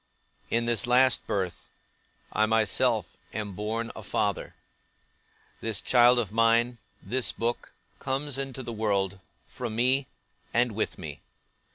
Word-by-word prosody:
In 115 0 +1
this 120 -1 +1
last 125 +1 +4
birth, 95 -4 -3 0.6
I 110 - +3
myself 110 -2 +2 0.2
am 105 -2 -3
born 110 +4 -3
a - - -7
father: - - -1 1.0
this 115 -2 0
child 125 0 +5
of 110 -5 0
mine, 115 +2 +3 0.2
this 125 +6 0
book, 120 +1 -2 0.3
comes 135 +1 -1
into 135 -1 -4
the 120 - -5
world, 100 -3 0 0.3
from 120 -4 -6
me, 130 +3 +2 0.5
and 120 0 +3
with 110 +1 -2
me. 75 -6 -8
115 Hz, 130 wpm, -27 LUFS, 105-125 Hz, 1.0 s, child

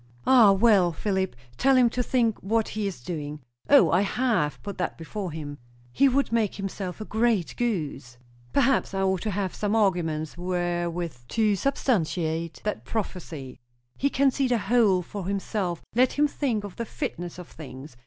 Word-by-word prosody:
"Ah! 240 -6 +7
Well, 195 -3 +4
Philip, 190 - -1 0.2
tell 270 +1 +4
him 250 -1 +6
to 250 - -1
think 235 -3 +1
what 220 +3 0
he 215 -1 -2
is 170 -11 -6
doing." 150 -1 -5 0.3
"O, 285 -1 +7
I 180 - +4
have 205 -7 0
put 200 -2 -6
that 180 - -2
before 185 +2 -5
him." 145 -2 -7 0.3
"He 275 - +4
would 275 0 +1
make 225 -4 +1
himself 195 -1 -5
a - - -4
great 220 -5 +1
goose." 150 - -3 0.3
"Perhaps 270 -6 +2
I 195 - 0
ought 190 -2 +1
to 220 - -2
have 195 -2 -2
some 210 +1 -1
arguments 170 -6 0
wherewith 175 -2 -2
to 215 - +2
substantiate 170 - -1
that 210 - -3
prophecy." 170 - -5 0.4
"He 280 - +1
can 275 0 +3
see 270 0 0
the 245 -1 +2
whole 205 -4 +3
for 190 +1 -6
himself. 195 -3 -2
Let 250 +3 +3
him 295 +1 +3
think 250 -7 -1
of 200 -3 -8
the 235 - -3
fitness 175 - -5
of 180 -2 -9
things. 135 -2 -10
195 Hz, 175 wpm, -26 LUFS, 170-230 Hz, 0.4 s, Ah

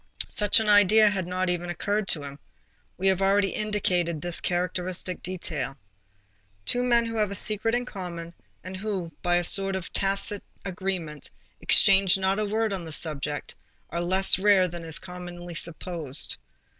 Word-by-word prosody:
Such 210 +1 +2
an 220 - -2
idea 210 +1 +5
had 190 -4 -3
not 185 +1 -2
even 175 0 -2
occurred 205 +3 -2
to 150 -6 +1
him. 140 0 -9 0.6
We 190 - -1
have 190 0 0
already 195 0 +2
indicated 185 -6 -1
this 175 +2 -2
characteristic 180 0 -2
detail. 150 -7 -5 0.9
Two 245 - +3
men 240 -1 +3
who 230 0 -4
have 210 -2 +1
a 200 - -3
secret 215 +3 0
in 245 0 -2
common, 170 -6 -7 0.3
and 185 +1 -8
who, 190 -4 -4
by 175 0 +1
a 175 - +1
sort 195 +2 +4
of 190 -2 -6
tacit 195 +1 +1 0.2
agreement, 180 -6 -5 0.3
exchange 195 -1 +5
not 190 +1 0
a 215 - 0
word 215 0 -1
on 185 -3 -4
the 160 - -8
subject, 150 -2 -3 0.4
are 170 +2 -2
less 190 +2 +5
rare 195 -2 +4
than 170 -1 -8
is 160 0 +2
commonly 175 -1 -9
supposed. 165 -3 -3
185 Hz, 165 wpm, -26 LUFS, 175-200 Hz, 0.9 s, idea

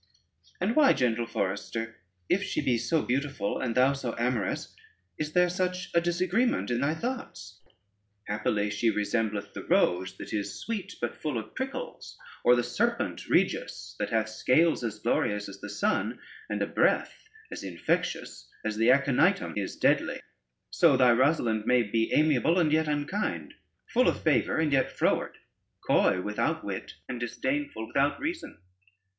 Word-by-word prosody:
"And 210 +7 0
why, 295 -3 +6
gentle 120 -2 0
forester, 115 +2 -3 0.3
if 195 - +2
she - - -2
be 120 -3 +1
so 155 +7 +1
beautiful, 135 -5 -1
and 120 -3 -2
thou 130 +2 +4
so 130 -4 -4
amorous, 120 -4 -2 0.4
is 155 0 -3
there 180 0 +4
such 180 0 -2
a 170 - +4
disagreement 180 - +1
in 120 0 0
thy 145 +3 +1
thoughts? 160 - -6 0.6
Happily 105 0 -1
she 115 +3 +1
resembleth 105 -1 -1
the - - -7
rose, 90 +1 +1
that - - -8
is 100 -2 -3
sweet 220 -5 -5
but - - -3
full 150 -6 -2
of 110 -1 -6
prickles? 270 - -6 0.3
or 125 - +6
the 120 - +1
serpent 120 - -1
Regius - - 0
that - - -1
hath 110 -1 0
scales 150 +8 +2
as 110 -2 -3
glorious 105 -1 0
as 100 0 -11
the 105 - -6
sun 200 - 0 0.3
and - - -1
a - - +1
breath 440 - 0 0.2
as - - -6
infectious 75 -8 -2 0.2
as 110 -1 -2
the 115 +2 +3
Aconitum 140 0 +3
is - - -3
deadly? - - +1 0.5
So 160 -6 +4
thy 125 -2 +6
Rosalynde 120 -4 +2
may 125 -1 +4
be 115 +1 0
most - - +1
amiable 155 +2 +3
and 160 -4 +3
yet 160 0 +2
unkind; 150 +8 -2 0.3
full 255 +2 +2
of - - 0
favor 155 -5 +2
and 155 -2 +1
yet 135 - +2
froward, - - 0 0.5
coy 90 - +3
without 105 0 -1
wit, - - -5
and 125 -2 -5
disdainful 130 0 -2
without 140 +5 +1
reason." 330 +4 -4
125 Hz, 160 wpm, -28 LUFS, 110-160 Hz, 0.6 s, why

